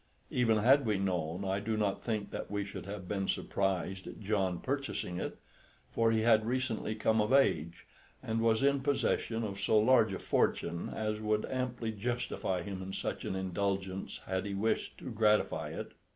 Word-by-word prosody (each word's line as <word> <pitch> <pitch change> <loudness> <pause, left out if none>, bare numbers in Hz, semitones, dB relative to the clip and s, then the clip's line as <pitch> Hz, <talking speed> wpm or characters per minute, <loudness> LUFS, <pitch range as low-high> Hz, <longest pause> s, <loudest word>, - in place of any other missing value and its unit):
Even 115 -3 +3
had 135 +6 +5
we 105 -2 +2
known, 90 -1 -1
I 95 +1 0
do 110 +2 -1
not 105 -2 0
think 110 -3 -2
that - - -5
we 100 -1 -2
should 100 - -7
have 100 -2 -6
been 95 0 -1
surprised 95 -1 -1
at - - -8
John 95 -4 0
purchasing 135 -10 -3
it; - - -4 0.5
for 115 0 +3
he 110 -1 +2
had 110 -1 +5
recently 120 -2 -1
come 110 0 +2
of 105 - 0
age, 85 - +2 0.4
and 110 0 -1
was 115 +2 +3
in 140 0 +4
possession 130 -4 0
of 100 -2 -4
so 110 - +3
large 110 -1 +5
a 95 - -2
fortune 85 0 0
as 105 -1 -2
would 105 0 0
amply 125 -3 -2
justify 110 -4 -2
him 95 -2 -5
in 95 +1 -6
such - - -3
an - - -2
indulgence 95 0 -2
had 95 +1 -2
he 100 - -3
wished 110 +3 -1
to - - -7
gratify 105 -1 +2
it. - - -6
105 Hz, 180 wpm, -32 LUFS, 95-115 Hz, 0.5 s, had